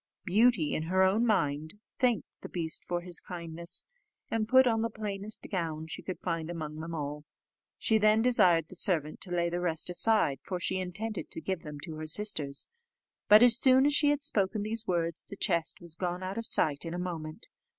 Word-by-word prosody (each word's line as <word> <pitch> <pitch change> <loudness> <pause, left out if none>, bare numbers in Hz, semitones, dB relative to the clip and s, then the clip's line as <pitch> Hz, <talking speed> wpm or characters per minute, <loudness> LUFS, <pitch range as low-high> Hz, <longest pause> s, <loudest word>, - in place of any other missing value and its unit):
Beauty, 210 -3 +3
in - - -1
her 190 +2 +3
own 210 +6 +3
mind, 155 -5 0 0.2
thanked 240 - +2 0.2
the - - -8
beast 165 -3 -2
for 175 0 -3
his 175 -1 -2
kindness, 170 0 -5 0.5
and 220 -1 0
put 260 +1 +6
on 225 -2 +2
the 230 - 0
plainest 210 -1 -5
gown 160 -4 -3
she 160 - -6
could 185 - -6
find 165 -2 -3
among 155 -3 -5
them 165 +1 -5
all. 150 -1 -5 0.5
She 220 -1 +2
then 215 +1 +4
desired 180 -10 +4
the - - -9
servant 155 -5 0
to 190 - -4
lay 170 -1 0
the 175 - -2
rest 175 0 0
aside, 180 - +3
for 180 +3 -4
she 185 +2 -1
intended 195 +4 -5
to - - -6
give 185 +1 -3
them 150 -1 -8
to 160 -1 -7
her 155 0 -6
sisters; 155 -6 +1 0.6
but, 210 +3 +9
as 245 0 +5
soon 260 0 +5
as 290 - +3
she 290 0 +4
had 290 0 0
spoken 210 -6 +1
these 225 +1 -1
words, 170 -2 -1
the 200 - -9
chest 170 -6 0
was 170 -2 -9
gone 180 +2 -3
out 190 +4 -4
of 230 - -4
sight 145 -2 +1
in 165 0 -5
a - - -3
moment. 170 0 -5
180 Hz, 205 wpm, -30 LUFS, 165-215 Hz, 0.6 s, but